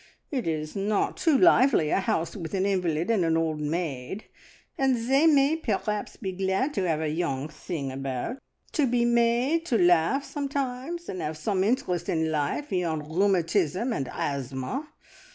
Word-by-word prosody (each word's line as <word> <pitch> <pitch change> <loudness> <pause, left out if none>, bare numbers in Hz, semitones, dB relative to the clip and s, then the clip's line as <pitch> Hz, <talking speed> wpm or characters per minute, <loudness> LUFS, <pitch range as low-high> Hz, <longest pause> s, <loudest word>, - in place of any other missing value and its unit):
It 255 - -2
is 155 -1 -3
not 200 +1 0
too 320 -5 +3
lively, 260 - +5
a - - +3
house 190 -4 -1
with 175 -1 -5
an 190 0 +1
invalid 180 -2 0
and 210 -6 +2
an 165 -1 +2
old 160 -2 -1
maid, 155 +2 -3 0.5
and 265 -1 +2
they 265 +7 +3
may 290 0 +4
perhaps 210 -6 -2
be 195 -4 -4
glad 190 +9 0
to 190 -7 0
have 160 -2 0
a 155 - -1
young 150 -4 -2
thing 150 -2 -5
about; 135 - -4 0.3
to 295 -4 +2
be 240 0 +2
made 240 +7 +2
to 240 - +2
laugh 175 - +3
sometimes 280 +3 -3
and 185 - -5
have 155 +1 -3
some 190 +3 0
interest 200 -7 0
in 160 -1 0
life 150 - -1
beyond 160 -4 -2
rheumatism 190 - +1
and 135 - -3
asthma! 140 - -3
190 Hz, 165 wpm, -27 LUFS, 160-250 Hz, 0.5 s, lively